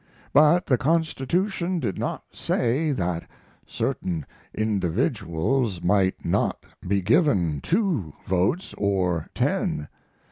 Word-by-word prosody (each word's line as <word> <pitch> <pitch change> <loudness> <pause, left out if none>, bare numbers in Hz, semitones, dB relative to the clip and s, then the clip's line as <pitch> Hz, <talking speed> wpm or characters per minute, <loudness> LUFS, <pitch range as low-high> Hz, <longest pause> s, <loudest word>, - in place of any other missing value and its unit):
But 155 +4 +5
the 130 -3 +2
constitution 170 +4 0
did 115 - -2
not - - -3
say 140 +7 0
that 90 -9 -2 0.4
certain 85 -5 -2 0.3
individuals 105 - 0
might 95 0 +2
not - - 0 0.2
be 100 0 +1
given 95 - +2
two 170 - 0
votes 95 - 0
or 90 -5 0
ten. 75 - 0
110 Hz, 100 wpm, -25 LUFS, -, 0.4 s, But